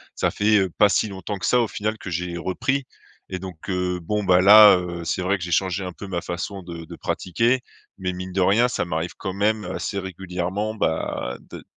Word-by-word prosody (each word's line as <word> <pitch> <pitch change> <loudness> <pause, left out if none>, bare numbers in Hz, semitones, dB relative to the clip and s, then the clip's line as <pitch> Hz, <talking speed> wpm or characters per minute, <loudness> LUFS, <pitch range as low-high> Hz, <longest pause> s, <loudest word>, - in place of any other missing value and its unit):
ça - - 0
fait, 105 +1 +2
heu, 95 -1 +1
pas 105 - +6
si 105 +1 +1
longtemps 100 +1 -5
que - - -4
ça 125 - +4
au 115 - +2
final 110 +2 -3
que 95 - -8
j'ai 85 0 -3
repris 130 +10 -1 0.5
et 95 - -2
donc, 90 -1 -9
heu, 90 -1 -1
bon, 105 +4 -2
bah, 90 0 +5
là, 105 +1 +9
heu, 85 -1 -5
c'est 90 - -1
vrai 100 +2 +1
que 90 - -7
j'ai 85 - -2
changé 95 +1 0
un 90 - -6
peu 100 - -9
ma 90 -3 -3
façon 90 +2 -5
de 85 -1 -8
de - - -10
pratiquer, 115 +8 0 0.4
mais 95 -1 -2
mine 90 0 -7
de 95 - +1
rien 110 +7 +4
ça 125 - -1
m'arrive 85 +1 -3
quand 95 - -4
même 105 +1 +1
assez 100 -1 -3
régulièrement, 95 +3 -4
bah, 80 - -2
d - - -11
t - - -15
95 Hz, 230 wpm, -23 LUFS, 90-105 Hz, 0.5 s, là